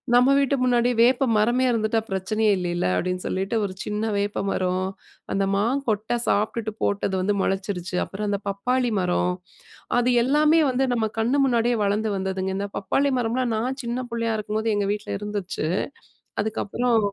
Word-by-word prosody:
"நம்ம 250 +2 +6
வீட்டு 280 0 +2
முன்னாடி 245 -1 +3
வேப்ப 250 +3 +4
மரமே 240 +5 +3
இருந்துட்டா 225 -1 +1
பிரச்சனையே 205 +3 0
இல்லைல" 175 -1 -1
அப்படின்னு 180 - -1
சொல்லிட்டு, 195 +4 -2
ஒரு 190 - -5
சின்ன 210 +1 -3
வேப்பமரம் 190 -2 -1 0.5
அந்த 195 - +1
மாங்கொட்டை 225 0 0
சாப்பிட்டுட்டு 220 +2 0
போட்டது 200 -1 0
வந்து 200 +3 +1
முளைச்சிருச்சு. 190 -2 -2
அப்புறம் 210 +2 -5
அந்த 200 -1 0
பப்பாளி 245 +5 0
மரம். 180 0 +1 0.7
அது 245 +1 +2
எல்லாமே 300 +5 +4
வந்து 260 +1 +1
நம்ம 230 -2 +1
கண்ணு 240 +5 +2
முன்னாடியே 240 -1 +2
வளர்ந்து 210 +2 +1
வந்ததுங்க. 190 0 -2
இந்த 200 +1 -2
பப்பாளி 275 +8 +1
மரம்லாம் 240 +1 0
நான் 255 +5 -2
சின்ன 240 +1 -2
புள்ளையா 230 -1 -1
இருக்கும்போது 215 +1 -1
எங்கள் 200 -1 0
வீட்டில 210 -1 -4
இருந்துச்சு. 205 -6 -3 0.8
அதுக்கப்புறம் 225 +2 0
215 Hz, 145 wpm, -24 LUFS, 195-240 Hz, 0.8 s, நம்ம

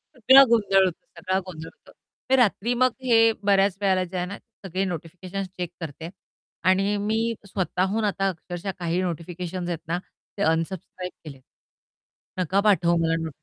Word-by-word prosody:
सगळा 265 +3 +8
गोंधळ 200 -4 +4
होतो, 180 -3 -4
सगळा 185 +2 0
गोंधळ 165 -3 -8
होतो. - - -21 0.4
ते 265 - +5
रात्री 240 -1 +2
मग 255 +1 +3
हे 225 -2 +5
बऱ्याच 195 -1 +3
वेळेला 190 -2 +2
जे 180 +1 -6
आहे 180 - -1
ना, 200 +2 -7 0.3
सगळे 190 +1 -2
नोटिफिकेशन्स 185 +2 -5
चेक 180 -2 -3
करते 160 +1 -6 0.6
आणि 195 +2 +2
मी 220 +3 0
स्वतःहून 190 +3 -1
आता 195 -1 0
अक्षरशः 175 +2 -5
काही 175 +1 -1
नोटिफिकेशन्स 175 +1 -4
आहेत 170 -2 -2
ना 170 - 0 0.4
ते - - -4
अनसबस्क्राईब 175 +2 -2
केलेत. 140 -4 -10 1.0
नका 185 +2 +1
पाठवू 180 -5 +3
मला 165 0 +2
नो 160 - -3
185 Hz, 155 wpm, -25 LUFS, 170-200 Hz, 1.0 s, सगळा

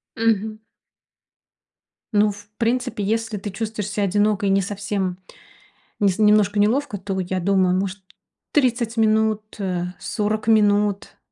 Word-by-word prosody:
Мгм. 220 -1 0 1.5
Ну, 210 0 +4
в 205 0 -12
принципе, 240 -1 -1
если 220 +1 -1
ты 205 +1 -5
чувствуешь 210 0 -4
ся 205 0 -1
одиноко 205 +1 +1
и - - +2
не 195 0 +3
совсем, 200 -1 -3 0.8
нес 200 -2 +2
немножко 210 -1 +4
неловко, 230 +3 +1
то 190 0 -4
я 185 0 -2
думаю, 185 0 +2
может, 195 +1 -3 0.5
30 240 -5 +1
минут, 220 -1 +2 0.2
э, 180 -3 -2
40 215 +1 -2
минут- 205 -2 +2
205 Hz, 125 wpm, -22 LUFS, 195-220 Hz, 1.5 s, Ну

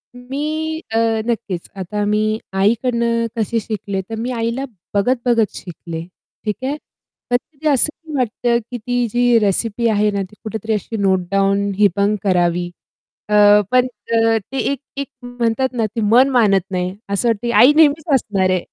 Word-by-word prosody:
मी 305 +5 -3
अ, 225 - 0 0.3
नक्कीच, 215 -7 -3
आता 200 +2 -3
मी 215 +1 +1
आईकडून 235 +5 +1 0.3
कशी 225 +1 0
शिकले, 200 -2 -4
तर 225 - -4
मी 240 +3 -2
आईला 235 +2 -2 0.3
बघत-बघत 235 +1 +1
शिकले, 170 -2 -7 0.4
ठीक 210 -1 -1
आहे. 280 +3 -1 0.5
पण 245 - +4
कधी 305 +4 -8
असं 305 +2 +1
वाटतं, 240 -1 +1
की 245 - -3
ती 245 +2 -1
जी 245 +1 +3
रेसिपी 220 +3 0
आहे 210 -1 +2
ना, 200 - -1
ती 190 +3 -13
कुठेतरी 220 0 -3
अशी 215 +2 -3
नोटडाऊन 195 +1 +1
हिबंग 205 +1 +3
करावी. 175 -2 +1 0.6
अ, - - -1 0.4
पण 255 0 +4 0.2
अ, 225 0 +3
ते 270 - -4
एक 280 - -3 0.2
एक 280 -1 -3 0.2
म्हणतात 245 +1 -1
ना, 230 -2 0
ती 220 +2 -4
मन 260 +3 +6
मानत 215 -7 +3
नाही. 180 0 -2
असं 200 +4 0
वाटते 230 +1 -1
आई 250 +4 +7
नेहमीच 310 0 +4
असणार 200 -6 +1
आहे. 185 -2 +1
225 Hz, 155 wpm, -19 LUFS, 200-245 Hz, 0.6 s, आई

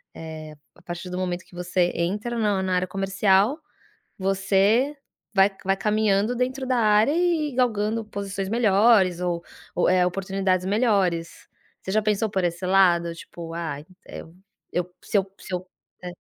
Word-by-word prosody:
eh, 155 -1 -8 0.2
a - - -20
partir 175 +1 -7
do 180 - -4
momento 180 -1 -3
que 180 - -24
você 180 0 0
entra 205 +7 -2
na 205 -3 +1
na 185 -1 -1
área 180 0 0
comercial, 195 - +2 0.6
você 195 +8 +2 0.4
vai 195 0 +5 0.2
vai 195 - +2
caminhando 210 +2 +1
dentro 255 +2 -2
da 255 - +1
área 215 +4 +4
e 335 -4 +1
galgando 225 -3 0
posições 195 -2 -4
melhores 205 -4 +4
ou 175 -1 -2 0.3
ou 175 - +2
é 180 -1 +4
oportunidades 190 0 -1
melhores, 195 -6 0 0.4
você 190 - -4
já 215 - +3
pensou 215 0 0
por 190 -2 -1
esse 175 +1 -2
lado? 175 -3 +3
Tipo 165 0 -9
"ah, 165 -4 -3 0.3
eu 165 - -10 0.4
eu 180 0 -2
se 205 - +1
eu 195 0 -2
se - - -11
eu" 180 +1 -5 0.3
É. 180 - -5
195 Hz, 160 wpm, -24 LUFS, 180-215 Hz, 0.6 s, vai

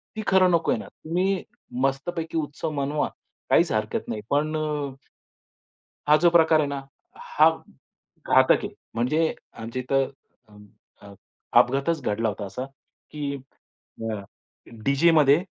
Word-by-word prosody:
ती 215 - -3
खरं 185 -1 +5
नकोय 170 -1 +2
ना. - - -8 0.2
तुम्ही 185 +3 0 0.4
मस्तपैकी 160 +4 -1
उत्सव 155 +1 -3
मनवा, 145 +2 0 0.4
काहीच - - +4
हरकत - - -2
नाही. 105 - -3
पण 155 +2 +1
अ, 150 -3 -2 1.1
हा 150 - +7
जो 175 +1 +5
प्रकार 160 -2 +5
आहे 145 - +1
ना, 140 -1 -4 0.4
हा 155 +2 +4 0.8
घातक - - +5
आहे. - - -2 0.3
म्हणजे 150 +8 +1 0.2
आमच्या 115 +3 -5
इथं 135 +1 +1 0.4
अ, 105 - -19 0.5
अ 100 - -12 0.5
अपघातच 140 +5 +2
घडला 110 +1 0
होता 105 0 -4
असा, 115 +7 -5 0.5
की 145 -2 -4 0.4
अ, 115 0 -7
अ, 100 -1 -7 0.6
डीजेमध्ये 150 +2 +4
145 Hz, 130 wpm, -25 LUFS, 135-160 Hz, 1.1 s, हा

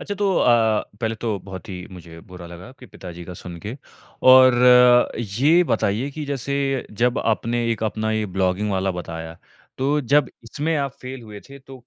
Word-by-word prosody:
अच्छा 205 - -5
तो 200 -1 0
अ, 115 -3 +3 0.2
पहले 115 -1 -1
तो 110 -2 -3
बहुत 95 +2 -10
ही 90 -1 -7
मुझे 85 -3 -12
बुरा 90 -2 -12
लगा 85 +4 -11
आपके 130 -1 -15
पिता 90 -4 -11
जी 85 0 -10
का 90 - -9
सुनके, 90 +7 -8 0.5
और 130 -1 +7 0.9
ये 165 +6 +5
बताइए 115 0 -1
कि 150 +1 -6
जैसे 140 0 -2 0.2
जब 125 0 +2
आपने 115 +2 -1
एक 115 -1 -3
अपना 110 0 -2
ये 110 -1 -1
ब्लॉगिंग 95 +2 -1
वाला 95 0 0
बताया, 80 -2 -7 0.4
तो 140 +3 +1
जब 140 0 +2
इसमें 150 +8 -2
आप 140 -2 -2
फेल 130 -1 -8
हुए 105 -2 -11
थे 140 - -12
तो 135 -1 -14
115 Hz, 180 wpm, -22 LUFS, 95-135 Hz, 0.9 s, और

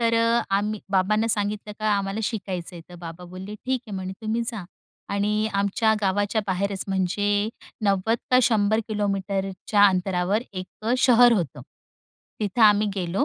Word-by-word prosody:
तर 230 0 +2
अ, 230 +1 +3
आम्ही 210 +1 0
बाबांना 205 +3 +2
सांगितलं 210 0 -1
का 215 - -1
आम्हाला 195 +2 -2
शिकायचं 190 -6 -4
आहे. 165 - -10
तर 180 - -12
बाबा 170 +1 -9
बोलले, 185 +3 -8
"ठीक 255 +4 -2
आहे," 210 - -6
म्हणे, 190 0 -4
"तुम्ही 220 +2 -1
जा." 215 -6 -6 0.5
आणि 210 +2 +1
आमच्या 200 +2 +2
गावाच्या 205 +2 +1
बाहेरच 195 +1 -1
म्हणजे 205 +2 0 0.4
90 200 +3 +2
का 255 - +6
100 220 -2 +3
किलोमीटरच्या 195 -1 0
अंतरावर 185 +2 +1
एक 185 -1 -5 0.2
अ, 225 +2 0
शहर 245 -1 +6
होतं. 175 - -1 0.8
तिथं 210 +2 0
आम्ही 210 0 +6
गेलो. 185 +5 0
205 Hz, 155 wpm, -24 LUFS, 190-220 Hz, 0.8 s, का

